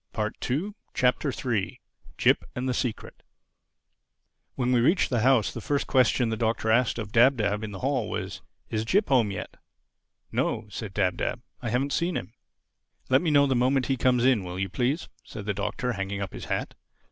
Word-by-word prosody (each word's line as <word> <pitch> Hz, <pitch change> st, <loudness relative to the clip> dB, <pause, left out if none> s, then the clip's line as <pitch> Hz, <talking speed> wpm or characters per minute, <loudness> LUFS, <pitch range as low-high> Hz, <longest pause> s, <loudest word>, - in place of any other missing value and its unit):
THE -, -, -17 dB, 0.2 s
THIRD 170 Hz, +12 st, -2 dB, 0.2 s
CHAPTER 125 Hz, +3 st, +2 dB, 0.9 s
JIP -, -, +3 dB
AND 125 Hz, +1 st, -2 dB
THE 130 Hz, -, +1 dB
SECRET 120 Hz, -2 st, -4 dB, 1.3 s
WHEN 125 Hz, -1 st, 0 dB
we 125 Hz, -, +4 dB
reached 160 Hz, +9 st, +3 dB
the 120 Hz, -, +2 dB
house 125 Hz, -1 st, +3 dB
the -, -, -6 dB
first 145 Hz, -2 st, 0 dB
question 125 Hz, -2 st, +3 dB
the 110 Hz, -, -1 dB
Doctor 110 Hz, 0 st, 0 dB
asked 120 Hz, +1 st, +3 dB
of 110 Hz, -3 st, -5 dB
Dab 125 Hz, +4 st, +5 dB
Dab 105 Hz, -1 st, 0 dB
in 110 Hz, -, -4 dB
the 95 Hz, -3 st, -8 dB
hall -, -, 0 dB
was, -, -, -4 dB, 0.3 s
"Is 110 Hz, -1 st, 0 dB
Jip 195 Hz, -, +2 dB
home 125 Hz, -6 st, +4 dB
yet?" 100 Hz, -, -6 dB, 0.7 s
"No," 110 Hz, -, -1 dB
said 100 Hz, -1 st, -7 dB
Dab 95 Hz, -3 st, +1 dB
Dab, -, -, -3 dB, 0.2 s
"I 120 Hz, -, -3 dB
haven't 135 Hz, +5 st, 0 dB
seen 170 Hz, +1 st, 0 dB
him." 115 Hz, -, -7 dB, 0.8 s
"Let 130 Hz, +2 st, +5 dB
me 170 Hz, -, 0 dB
know 145 Hz, -1 st, +5 dB
the 135 Hz, -2 st, +1 dB
moment 130 Hz, +1 st, +2 dB
he 135 Hz, -, +1 dB
comes 125 Hz, -1 st, +2 dB
in, 125 Hz, -7 st, +4 dB
will 90 Hz, 0 st, -6 dB
you, 95 Hz, 0 st, -2 dB
please?" 130 Hz, -, -1 dB, 0.2 s
said 105 Hz, -, -8 dB
the 100 Hz, -, 0 dB
Doctor, 125 Hz, +5 st, -2 dB
hanging 100 Hz, -1 st, -3 dB
up 100 Hz, -2 st, -4 dB
his -, -, -7 dB
hat. -, -, -2 dB
125 Hz, 195 wpm, -27 LUFS, 110-130 Hz, 1.3 s, Dab